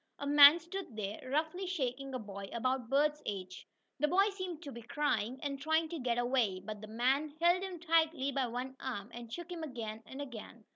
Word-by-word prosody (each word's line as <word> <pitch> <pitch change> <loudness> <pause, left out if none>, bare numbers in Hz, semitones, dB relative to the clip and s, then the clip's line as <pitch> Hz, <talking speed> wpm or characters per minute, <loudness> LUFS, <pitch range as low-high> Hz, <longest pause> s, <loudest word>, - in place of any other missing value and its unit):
A 285 - -5
man 290 +3 +9
stood 345 - -7
there, 205 0 -3
roughly 315 +7 -1
shaking 270 -6 -2
a - - +1
boy 200 -3 -7
about 255 0 -1
Bert's 300 +2 +2
age. 185 -3 -5 0.3
The 300 - +3
boy 390 +6 +4
seemed 370 -4 -6
to 280 - -7
be 235 - -8
crying, 250 -1 -1
and 280 -1 -3
trying 315 +2 +2
to 335 - -4
get 245 -2 0
away, 240 -6 +1
but 210 +2 -7
the 215 - -8
man 265 +7 +1
held 345 +2 +4
him 375 -3 -5
tightly 320 -4 +2
by 265 -2 0
one 250 +3 -4
arm, 235 -5 -5
and 235 -1 -8
shook 345 +6 -6
him 345 -2 -5
again 230 -7 -5
and 265 - -8
again. 235 -4 -8
270 Hz, 205 wpm, -33 LUFS, 235-315 Hz, 0.3 s, man